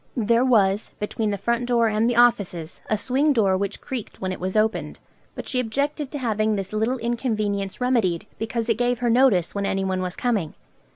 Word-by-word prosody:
There 235 +1 +3
was, 210 -5 +2
between 210 +1 -2
the 200 - -1
front 235 +4 -1
door 235 -2 +3
and 220 +2 +1
the 245 - 0
offices, 200 -9 +2
a 215 - +2
swing 270 +7 +2
door 200 -6 +3
which 200 +1 -2
creaked 250 -5 -6
when 185 -1 -2
it 185 - -5
was 185 +3 -2
opened; 220 +1 0 0.4
but - - -7
she 255 - 0
objected 280 +4 -2
to 290 - -5
having 220 -4 0
this 195 0 -4
little 225 +4 0
inconvenience 215 -5 -2
remedied, 230 -10 +1
because 225 +1 -2
it 230 -1 +1
gave 245 0 +1
her 240 0 0
notice 230 -8 +3
when 200 -1 -1
anyone 190 -1 -1
was 180 0 -3
coming. 215 -11 -1
220 Hz, 195 wpm, -23 LUFS, 200-245 Hz, 0.4 s, There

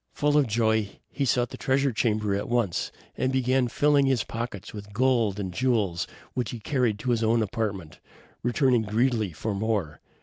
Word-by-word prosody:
Full 145 0 +2
of 145 -3 +4
joy, 110 -2 0
he 140 - -1
sought 120 -1 +1
the - - -7
treasure 135 +1 +2
chamber 110 -3 0
at 100 - -2
once, 120 -8 0 0.2
and 130 - 0
began 130 -1 +2
filling 145 +2 +3
his 130 -5 +2
pockets 115 -4 -6
with 105 -1 -9
gold 115 -4 +2
and 95 -3 -4
jewels, 105 -7 0 0.3
which 125 -3 -2
he 120 - -6
carried 120 -3 0
to 125 - 0
his 115 -1 +1
own 115 +1 +3
apartment, 100 -6 -4 0.4
returning 125 0 +2
greedily 110 -1 +1
for 105 +7 -3
more. 100 - -2
115 Hz, 175 wpm, -26 LUFS, 105-130 Hz, 0.4 s, of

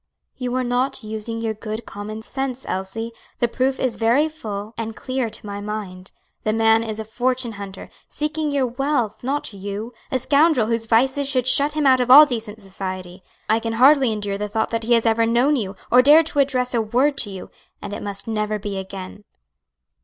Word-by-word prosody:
"You 250 -1 -3
are 255 - +1
not 250 +1 -1
using 220 +1 -4
your 225 -1 -1
good 215 +1 -6
common 215 +2 -7
sense, 265 0 -4
Elsie; 195 +5 -4 0.3
the 240 - +2
proof 260 +3 -1
is 255 -3 -1
very 240 +7 +3
full 215 -9 -7
and 225 -1 -5
clear 255 -1 -2
to 215 - -8
my 205 0 -5
mind. 200 -3 -6 0.3
The 215 - 0
man 225 0 +4
is 220 -1 -5
a 220 - -4
fortune 250 +2 -1
hunter, 200 -2 -8 0.2
seeking 305 +1 -2
your 280 -2 +1
wealth, 250 -3 -1
not 275 -2 -2
you; 200 +4 -6 0.2
a 260 - +2
scoundrel 280 0 +3
whose 230 0 -2
vices 265 +5 +2
should 255 -3 +1
shut 285 +3 +3
him 305 -1 0
out 260 -1 +5
of 250 0 0
all 290 +4 +11
decent 225 -5 -5
society. 185 -1 -6 0.3
I 220 +1 +3
can 230 0 -3
hardly 265 +1 +5
endure 205 -2 -3
the 210 0 -3
thought 220 +1 -1
that 230 -1 -2
he 240 - +3
has 230 -1 +3
ever 225 0 +3
known 245 +6 +3
you, 205 -6 -3 0.2
or 250 +1 +7
dared 300 +5 +7
to 295 -2 -2
address 255 -3 +1
a 235 - +2
word 250 +7 +1
to 210 - +1
you, 190 -2 -9 0.3
and 205 0 -7
it - - -5
must 200 0 -5
never 215 -1 -1
be 200 -1 -4
again." 190 +1 -8
230 Hz, 205 wpm, -22 LUFS, 210-260 Hz, 0.3 s, all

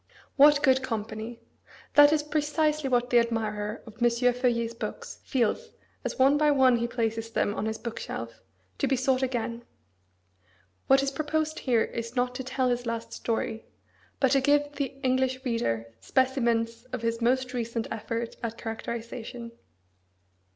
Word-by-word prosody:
What 290 +1 +6
good 265 -2 +4
company! 225 -1 -5 0.5
That 290 0 +8
is 305 -1 +2
precisely 300 -1 0
what 245 -1 +1
the 240 - +7
admirer 215 -2 -2
of 225 +1 -14
M. 240 - +6
Feuillet's 240 -1 +1
books 470 - -6
feels 265 - -1 0.3
as - - -4
one 275 +2 +5
by 300 0 +4
one 260 -4 +5
he 235 0 -1
places 225 -1 -2
them 205 -2 0
on 215 - -2
his 220 0 -2
book 230 0 -6
shelf, 115 0 -6 0.4
to - - +1
be 270 - +2
sought 260 0 +1
again. 240 -2 -2 1.2
What 270 0 +5
is 275 - 0
proposed 310 +2 -1
here 240 -4 +2
is 230 +1 -5
not 250 0 +1
to 260 +1 -5
tell 260 0 0
his 245 0 -1
last 230 0 -4
story, 225 -1 -3 0.5
but 265 -2 +3
to 275 -1 +4
give 290 +1 +3
the 285 -1 -2 0.2
English 260 0 +1
reader 115 - -1
specimens 235 - +1
of 255 -2 -6
his 230 0 -1
most 255 +2 +1
recent 230 -1 -2
effort 230 +1 -4
at 230 -1 -4
characterisation. 235 +1 -6
245 Hz, 160 wpm, -27 LUFS, 230-265 Hz, 1.2 s, That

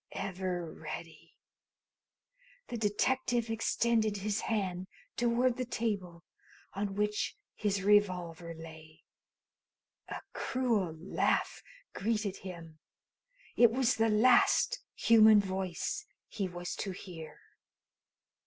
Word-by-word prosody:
"Ever 185 -3 -3
ready!" 165 +1 -9 1.3
The - - -4
detective 235 +2 +1
extended 225 -1 +1
his 205 +2 -1
hand 185 -4 -2 0.3
toward 240 +1 +2
the 255 - -1
table, 195 -8 -3 0.5
on 200 0 -3
which 210 0 -1 0.2
his 200 -2 -1
revolver 180 -5 +2
lay. 160 -1 -12 1.0
A - - -5
cruel 225 -10 0
laugh 180 - 0 0.3
greeted 210 -1 -1
him. 170 -4 -9 0.8
It 235 - +7
was 255 +2 +2
the 225 0 +3
last 240 +4 +4 0.2
human 220 -2 +7
voice 190 - -3 0.2
he 200 -3 -3
was 175 0 -5
to 195 - -3
hear. 165 -5 -9
200 Hz, 95 wpm, -32 LUFS, 175-225 Hz, 1.3 s, It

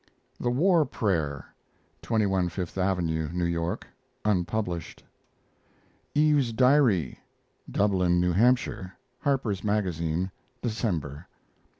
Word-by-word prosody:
THE 120 - 0
WAR 165 +6 +4
PRAYER 85 - -1 0.6
(21 95 -5 +1
Fifth 90 0 -5
Avenue, 85 -5 0
New 90 0 -1
York) 85 0 -2 0.4
(unpublished). 90 -3 -1 1.1
EVE'S 145 -5 +3
DIARY 125 - +3 0.5
(Dublin, 90 -4 +2
New 90 0 +2
Hampshire) 100 -2 +1 0.2
Harper's 125 -8 0
Magazine, 90 -4 -1 0.3
December. 90 - -2
95 Hz, 85 wpm, -27 LUFS, 85-115 Hz, 1.1 s, WAR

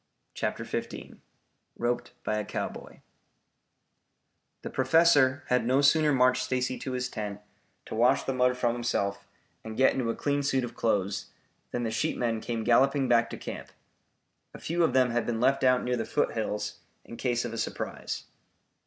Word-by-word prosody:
CHAPTER - - -3
XV - - -5 0.6
ROPED 120 +1 -2
BY 110 - -1
A - - -2
COWBOY - - -6 1.6
The - - -4
Professor 135 -1 +4
had 125 -1 +3
no 130 +4 +3
sooner 150 +2 +4
marched 130 -1 +3
Stacy 130 0 -1
to 130 - -4
his 125 0 -1
tent 105 -4 -5 0.5
to - - -8
wash 120 +5 +3
the 135 - -2
mud 125 0 +2
from 120 -2 +1
himself 100 -4 -2 0.4
and 110 0 -7
get 130 - +5
into 125 -3 -1
a 115 - -1
clean 145 0 0
suit 135 -2 +1
of 120 -1 -5
clothes, 100 -3 0 0.4
than 120 - -3
the 115 - -1
sheepmen 115 0 -1
came 115 -2 -3
galloping 135 +4 +3
back 120 -1 +3
to - - -6
camp. - - -7 0.9
A - - -9
few 170 +1 0
of - - +2
them 130 -2 +4
had 120 0 -1
been 115 -2 -1
left 135 +3 +2
out 130 -1 +4
near 125 0 0
the 115 - -2
foothills 105 -1 -2 0.3
in 115 - -9
case 120 -1 -1
of 120 - -5
a - - -5
surprise. - - -4
125 Hz, 170 wpm, -28 LUFS, 115-130 Hz, 1.6 s, get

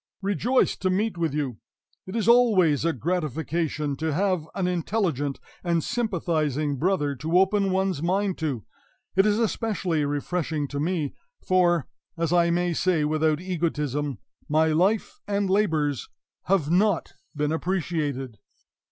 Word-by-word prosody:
"Rejoiced 230 +6 +1
to 185 - +1
meet 205 +3 0
with 165 -2 -1
you! 135 -7 -2 0.5
It 185 - -6
is 225 -2 0
always 210 - +5
a 165 - +3
gratification 155 0 -2
to 160 0 -1
have 185 -2 0
an 190 - 0
intelligent 170 - -1 0.2
and 170 -3 +1
sympathizing 155 - -1
brother 155 -4 +1
to 160 +6 +1
open 195 +1 +3
one's 190 -4 0
mind 190 +2 0
to; 135 - -2 0.5
it 195 +2 +5
is 210 0 +2
especially 210 -8 0
refreshing 145 +1 -2
to 140 - -4
me, 155 -2 -1 0.3
for, 175 -4 +3 0.3
as 165 0 0
I 170 -1 +4
may 175 0 +1
say 165 -3 +1
without 155 0 +1
egotism, 150 - -2 0.3
my 160 +2 +3
life 195 - +1
and 200 -1 0
labors 155 - +1 0.4
have 170 -5 +1
not 195 0 +2 0.2
been 150 0 0
appreciated." 155 - -2
170 Hz, 135 wpm, -25 LUFS, 150-190 Hz, 0.5 s, always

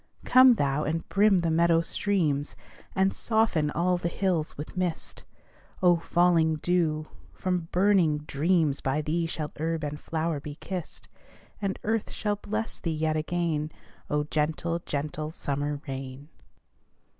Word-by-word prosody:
Come 255 -1 +7
thou, 140 -3 0
and 165 +2 -2
brim 200 -2 +4
the 165 -1 0
meadow 165 0 +4
streams, 165 -6 0 0.4
And 190 0 +2
soften 220 -10 +1
all 175 +3 +1
the 170 - -1
hills 175 -4 -1
with 150 +6 -7
mist, 180 -3 -3 0.6
Oh, 175 -1 +6
falling 170 -1 +3
dew! 155 -1 0 0.3
From 180 -3 -2
burning 180 -5 +3
dreams 155 -1 +1
By 135 +3 0
thee 165 +2 0
shall 155 -2 -4
herb 160 0 -1
and 150 0 -4
flower 160 -1 -2
be 145 0 -8
kissed; 180 +1 -6 0.5
And 195 -1 -1
earth 220 0 0
shall 205 -1 -2
bless 215 +2 -4
thee 170 - -3
yet 155 0 0
again, 155 -1 -1 0.4
Oh, 150 0 +1
gentle, 155 +3 -1
gentle 150 +1 -3
summer 145 -2 -3
rain! 135 +2 -6
165 Hz, 140 wpm, -27 LUFS, 150-180 Hz, 0.6 s, Come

